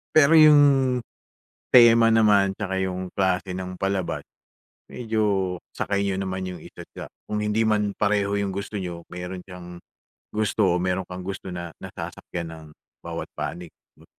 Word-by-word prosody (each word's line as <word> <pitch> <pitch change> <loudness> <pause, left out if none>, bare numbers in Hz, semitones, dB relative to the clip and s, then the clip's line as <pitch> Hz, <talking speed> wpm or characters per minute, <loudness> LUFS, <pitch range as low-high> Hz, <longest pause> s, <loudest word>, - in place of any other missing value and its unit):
Pero 155 -1 +6
'yung, 145 -5 +6 0.7
tema 115 -2 +8
naman, 105 -4 +4
tsaka 95 -2 -3
'yung 95 -1 -3
klase 95 0 0
ng 90 0 -5
palabas, 95 -1 -2 0.7
medyo 105 -6 -1 0.2
sakay 100 - -1
niyo 100 - -1
naman 95 -1 -3
'yung 90 -3 -8
isa't - - -12
isa - - -8 0.2
kung 105 0 -2
hindi 105 +1 +1
man 105 -1 +1
pareho 100 0 0
'yung 100 -2 -2
gusto 100 +1 -4
niyo, 85 -2 -6
meron 90 +1 -6
siyang 90 -1 -11 0.5
gusto 105 -3 +1
o 90 - 0
meron 90 0 -1
kang 90 0 -7
gusto 95 -1 -6
na 85 -1 -6
nasasakyan 85 -1 -7
ng 80 -1 -10 0.3
bawat - - -6
panig 85 -2 -5 0.2
'no. - - -20
95 Hz, 150 wpm, -24 LUFS, 90-105 Hz, 0.7 s, tema